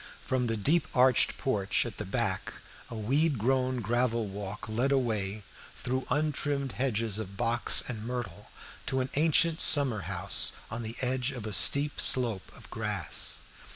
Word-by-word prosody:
From 130 -2 -1
the 115 -1 -2
deep 155 +12 +1
arched 125 -1 +3
porch 105 -6 -1
at 115 -4 -8
the 105 - -5
back 95 - -3 0.4
a - - -8
weed 135 +7 0
grown 130 +2 -1
gravel 115 +1 -1
walk 100 +1 -8
led 120 +5 -1
away 110 -6 -2 0.3
through 130 +1 -4
untrimmed 145 -2 -1
hedges 115 -5 -2
of 100 -2 -8
box 120 0 +5
and 110 -4 -5
myrtle 115 -5 -7 0.4
to 130 - -1
an 130 - -5
ancient 160 +2 +2
summer 135 -7 +4
house - - +2 0.2
on 115 +1 -5
the 115 0 -6
edge 130 0 0
of 125 -6 -7
a 110 - -6
steep 140 +8 +5
slope 115 -7 +2
of - - -15
grass. - - -3
120 Hz, 155 wpm, -28 LUFS, 110-135 Hz, 0.4 s, box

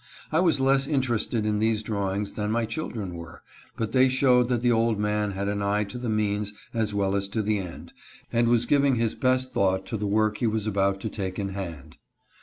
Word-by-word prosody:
I 160 - +2
was 165 -6 +3
less 135 +1 +3
interested 120 -5 0
in 105 -1 0
these 110 0 +1
drawings 100 -1 -2
than 105 -1 -3
my 115 +1 +1
children 110 - -4
were, 85 -1 -10 0.3
but 110 -1 -2
they 130 +1 +4
showed 125 -2 +4
that 120 -1 0
the 120 - +4
old 115 -2 +2
man 105 -1 0
had 100 +1 -3
an 100 0 -1
eye 100 +1 +1
to 105 +4 -7
the 120 -1 -3
means 105 -1 0 0.2
as 110 -3 0
well 100 -1 0
as 100 0 -1
to 110 +2 -1
the 105 0 0
end, 90 -3 -8 0.4
and 120 0 +3
was 120 0 +3
giving 140 0 +3
his 115 -1 0
best 130 0 0
thought 95 -1 +1
to 115 - -3
the 105 0 -2
work 105 +1 +1
he 120 - +1
was 110 -1 -1
about 100 -2 0
to 110 - -3
take 95 -3 -4
in 100 -1 -2
hand. 85 -8 -7
110 Hz, 220 wpm, -26 LUFS, 100-120 Hz, 0.4 s, they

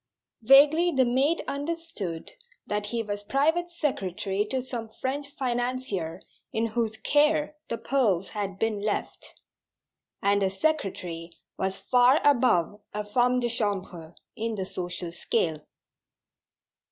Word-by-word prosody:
Vaguely 290 +8 +6
the 265 -4 +3
maid 270 +7 +2
understood 285 - -4 0.3
that 210 0 -2
he 230 +1 -1
was 205 -1 -4
private 315 +10 +1
secretary 205 - -1
to 260 +4 -2
some 240 -3 -5
French 280 +2 -2
financier 245 - -2 0.3
in 225 +1 0
whose 225 -1 -1
"care" 300 +5 +2
the 230 - -2
pearls 215 -11 +1
had 200 -3 -4
been 220 -1 0
left; 210 0 -4 0.8
and 200 0 +2
a 195 - +3
secretary 190 - -2 0.3
was 190 0 -2
far 250 +3 +4
above 235 - +3
a 210 - -1
femme 245 +4 +2
de 240 - +1
chambre 190 -8 -3 0.2
in 225 -1 -2
the 190 -2 -3
social 175 -2 -5
scale. 160 -2 -1
230 Hz, 125 wpm, -27 LUFS, 195-270 Hz, 0.8 s, Vaguely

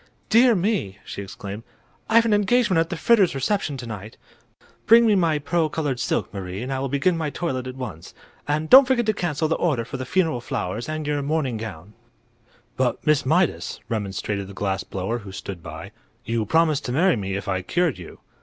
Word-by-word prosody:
"Dear 235 +1 +6
me!" 180 - -1
she - - -6
exclaimed; 100 +2 -7 0.5
"I've 230 +1 +5
an 225 - +2
engagement 210 -2 +3
at 165 0 +1
the 170 - -4
Fritters' 195 -2 +3
reception 145 +1 -1
to 120 - -7
night. 110 -1 -8 0.7
Bring 225 -3 +6
my 165 -3 +2
pearl 160 +2 0
colored 145 -5 -2
silk, - - -1
Marie, 95 +1 -5
and 135 +2 -3
I 130 - -2
will 135 0 -2
begin 140 +7 +1
my 160 -2 -2
toilet 130 -5 -3
at 130 - -6
once. 130 -1 -8 0.3
And 150 +2 0
don't 265 - +9
forget 245 -3 +2
to 215 - +2
cancel 160 -5 -1
the 160 - +1
order 135 -10 0
for 130 - -6
the 130 - -5
funeral 160 -9 +1
flowers 115 +3 -4
and 155 -1 -3
your 145 -1 -1
mourning 140 -4 -1
gown." 105 -3 -8 0.8
"But, 130 -2 0
Miss 150 -3 +2
Mydas," 175 +3 +1
remonstrated 100 -2 -3
the 100 - -11
glass 95 -1 -2
blower, 100 +5 -3
who 100 -3 -10
stood 95 -2 -7
by, 80 +5 -9 0.3
"you 115 -2 -1
promised 160 +1 +2
to 125 - -2
marry 175 +7 +3
me 95 -3 -3
if 100 - -5
I 95 -1 -1
cured 165 - 0
you." 85 - -11
140 Hz, 200 wpm, -23 LUFS, 105-175 Hz, 0.8 s, don't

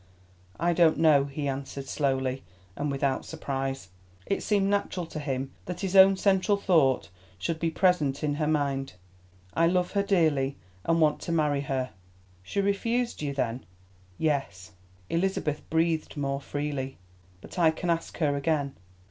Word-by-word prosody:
"I 175 +1 +2
don't 165 -1 +4
know," 155 -4 +5
he 145 +1 -4
answered 135 0 -4
slowly 135 -2 0 0.3
and 145 +1 -2
without 135 -1 0
surprise. 135 -7 -4 0.4
It 200 - -1
seemed 200 -2 +2
natural 200 -3 0
to 160 - -7
him 135 -2 -3
that 180 -1 -5
his 195 -1 -2
own 190 0 +8
central 195 +1 +3
thought 160 - +3 0.3
should 160 - -2
be 165 - +1
present 160 -6 +2
in 150 -1 +1
her 150 - +1
mind. 140 -4 0 0.6
"I 165 0 +3
love 180 0 +1
her 200 - +2
dearly, 155 -9 +2 0.3
and 165 0 +2
want 155 -2 +3
to - - -4
marry 150 -4 +2
her." 130 -2 -2 0.5
"She 200 - -2
refused 230 +4 0
you, 145 -2 -1
then?" 125 -2 -2 0.5
"Yes." 135 -12 -1 0.4
Elizabeth 165 - -1
breathed 160 -1 0
more 140 -1 -1
freely. 145 -2 -4 0.4
"But 140 - -9
I 165 -2 +6
can 170 +2 -1
ask 165 0 -2
her 145 -3 +1
again." 140 -1 0
150 Hz, 155 wpm, -28 LUFS, 135-175 Hz, 0.6 s, own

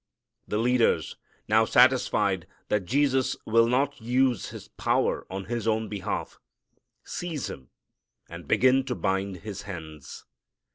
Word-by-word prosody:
The 105 - -1
leaders, 120 +1 +2 0.3
now 110 +1 +4
satisfied 120 -7 +3 0.2
that 105 -3 0
Jesus 135 0 +1
will 115 +1 +4
not 135 +2 0
use 125 -1 +1
His - - -10
power - - 0
on 95 0 -5
His 120 -2 -3
own 110 0 0
behalf, 100 -3 -4 0.6
seize 165 -6 -4
Him 65 -2 -11 0.6
and - - -10
begin 130 +1 +4
to 125 - -2
bind 95 -3 -2
His 105 -3 -6
hands. 80 -6 -9
115 Hz, 130 wpm, -27 LUFS, 95-130 Hz, 0.6 s, now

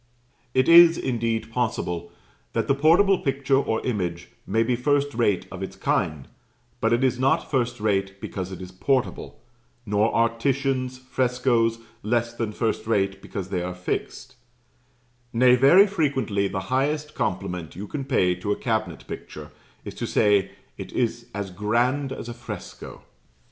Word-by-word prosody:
It 130 0 +3
is, 170 0 +8
indeed, 115 -3 -2
possible 90 -8 -2 0.4
that - - -1
the - - +4
portable 170 +7 +4
picture 135 -1 +1
or 110 -5 -2
image 90 -8 -3 0.2
may 110 +3 +2
be 125 +2 +1
first 145 +3 +1
rate 110 -5 +1
of 95 - -7
its 95 - -5
kind, 75 -4 -1 0.5
but 115 - +1
it 120 +2 +2
is 125 -1 +1
not 135 +6 +1
first 125 -4 0
rate 100 -2 -1
because 95 -2 -5
it 95 0 -7
is 90 - -9
portable; 125 +8 -1 0.5
nor 105 +2 +2
are 115 0 +3
Titian's 130 0 0
frescoes 125 -3 +1 0.2
less 120 +2 0
than 115 -2 -3
first 110 0 -2
rate 100 -3 0
because 95 -2 -6
they 90 -2 -1
are 90 +1 -4
fixed; 120 +7 -5 1.0
nay, 125 +1 +5
very 140 +10 +7
frequently 135 - 0
the 95 0 -3
highest 150 +3 0
compliment 90 -2 -3
you 100 +4 -6
can 140 +6 -5
pay 105 -10 +2
to 90 +3 -4
a - - +2
cabinet 110 - -2
picture - - -8 0.3
is - - -6
to - - -4
say 100 -2 +3 0.3
"It - - -7
is 120 0 -1
as 100 -2 -4
grand 120 +8 0
as 125 - -6
a 120 - -5
fresco." 115 -5 -9
115 Hz, 160 wpm, -24 LUFS, 100-130 Hz, 1.0 s, is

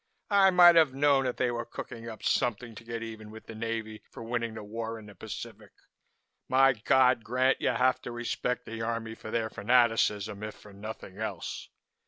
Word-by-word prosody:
I 200 -1 +6
might 175 -2 +8
have 155 -5 +4
known 140 -1 +3
that 125 - -2
they 125 -1 +1
were 120 0 -3
cooking 115 0 -8
up 110 - -10
something 120 0 0
to 110 - -11
get 115 0 -5
even 110 -1 -8
with 110 +1 -12
the - - -9
Navy 110 -1 -4
for - - -10
winning 115 -1 -3
this 110 - -7
war 115 +2 -5
in 110 - -12
the 105 - -12
Pacific. - - -9 0.8
My 135 +1 +5
God! 125 +1 +3
Grant, 130 +3 +1
you - - +2
have 130 0 +2
to - - -7
respect 120 +1 -3
the 115 0 -6
Army 115 0 -3
for 110 - -10
their 110 -1 -1
fanaticism, 110 -3 +2
if 105 0 -6
for 105 - -15
nothing 100 -1 -9
else. 105 -5 -5
115 Hz, 195 wpm, -29 LUFS, 110-125 Hz, 0.8 s, might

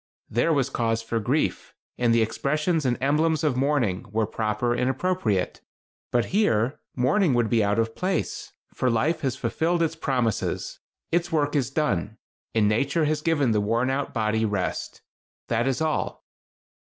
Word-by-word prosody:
There 120 +9 +2
was 140 -3 +1
cause 115 -2 0
for 115 0 -1
grief, 130 +8 -1 0.2
and 120 -1 +2
the 115 -1 +4
expressions 150 +7 0
and 120 - +1
emblems 155 +4 +2
of 150 -5 +2
mourning 125 -8 0
were 110 +1 +1
proper 110 +3 -1
and 125 +1 +1
appropriate. 130 - -1 0.5
But 120 -1 +2
here, 130 - +2 0.2
mourning 135 +4 +2
would 120 -2 +1
be 115 -2 +3
out 100 +1 +1
of 115 0 0
place, 185 +1 -2 0.2
for 130 - 0
life 155 +8 +1
has 130 -3 -1
fulfilled 165 +8 0
its 165 0 -1
promises. 125 -8 -1 0.3
Its 175 +1 +1
work 150 -2 +1
is 135 -4 +1
done, 110 - -1 0.4
and 110 -2 +4
nature 140 +9 +1
has 150 0 0
given 150 -6 +2
the 105 -1 +2
worn 115 +5 +1
out 140 +1 -2
body 110 -1 0
rest. 105 -4 -2 0.5
That 120 +2 +1
is 135 +2 0
all." 155 -1 -1
125 Hz, 165 wpm, -25 LUFS, 115-155 Hz, 0.5 s, the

